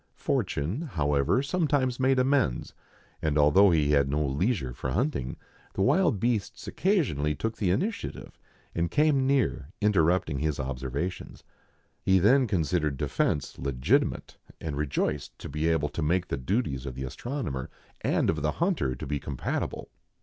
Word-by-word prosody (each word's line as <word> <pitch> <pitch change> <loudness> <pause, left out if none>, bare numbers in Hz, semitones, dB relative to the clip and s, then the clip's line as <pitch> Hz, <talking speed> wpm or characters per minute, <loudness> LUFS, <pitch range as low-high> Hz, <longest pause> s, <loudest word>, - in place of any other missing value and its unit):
Fortune, 85 - -1
however, 75 - +2
sometimes 145 -5 0
made 130 0 +3
amends; 130 - +1 0.5
for 80 -1 0
although 85 +7 +6
he 75 -4 +2
had 70 -2 +3
no 75 +2 0
leisure 70 - 0
for 65 - -4
hunting, 65 - -1 0.4
the 95 - +1
wild 160 - +3
beasts 110 -3 -1
occasionally 100 - +1
took 110 +10 -3
the 100 - 0
initiative, 200 - -3 0.3
and 85 0 0
came 145 - +3
near, 135 - +1
interrupting 90 -7 +2
his 75 0 -1
observations. 65 +7 -4 0.6
He 95 0 +4
then 125 +8 +4
considered 80 -6 0
defence 70 +1 -1
legitimate, 65 -2 0 0.2
and 80 -3 -4
rejoiced 75 0 -2
to - - -8
be 75 +3 -1
able 80 -3 +1
to - - -4
make 85 +4 +1
the - - 0
duties 70 - -1
of 65 - -5
the 65 - -5
astronomer 70 - -4 0.3
and - - +1
of 80 -2 -4
the 75 0 0
hunter 165 - 0
to - - -7
be 70 +1 -2
compatible. 70 -1 -4
80 Hz, 150 wpm, -28 LUFS, -, 0.6 s, although